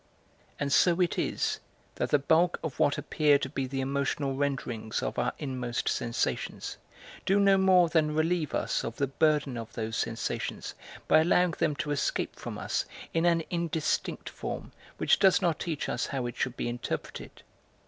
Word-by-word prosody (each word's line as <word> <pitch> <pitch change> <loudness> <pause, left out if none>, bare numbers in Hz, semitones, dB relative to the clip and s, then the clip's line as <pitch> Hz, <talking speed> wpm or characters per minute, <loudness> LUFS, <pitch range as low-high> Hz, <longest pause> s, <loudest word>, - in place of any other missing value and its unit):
And 140 0 0
so 175 0 +4
it 180 -2 +1
is - - -1 0.3
that - - -2
the 145 - +5
bulk 160 +5 +3
of 160 -5 -5
what 145 - +3
appear 150 -2 +3
to 140 - -3
be 135 -1 -2
the 135 +1 -2
emotional 140 +1 -1
renderings 130 -6 -2
of - - -2
our - - +1
inmost 125 -4 -3
sensations 115 0 -2 0.5
do 195 +2 +3
no 200 -1 +6
more 190 -2 +5
than 155 -2 +1
relieve 160 -1 +1
us - - 0
of 115 - -4
the 140 - +1
burden 145 -1 +1
of 115 -1 -7
those 110 0 -3
sensations 115 -1 -3 0.3
by - - +6
allowing 175 +2 +3
them 155 -2 0
to 145 +1 -3
escape 145 - -1
from - - -6
us - - -1 0.3
in 165 +1 +2
an 170 -1 +3
indistinct 165 -3 -1
form - - -6 0.3
which - - +3
does 190 -2 +5
not 165 -4 +1
teach 160 -4 -3
us - - -1
how 135 -3 -2
it 120 - -4
should 125 -1 -2
be - - -2
interpreted. 120 0 -5
145 Hz, 175 wpm, -29 LUFS, 130-165 Hz, 0.5 s, no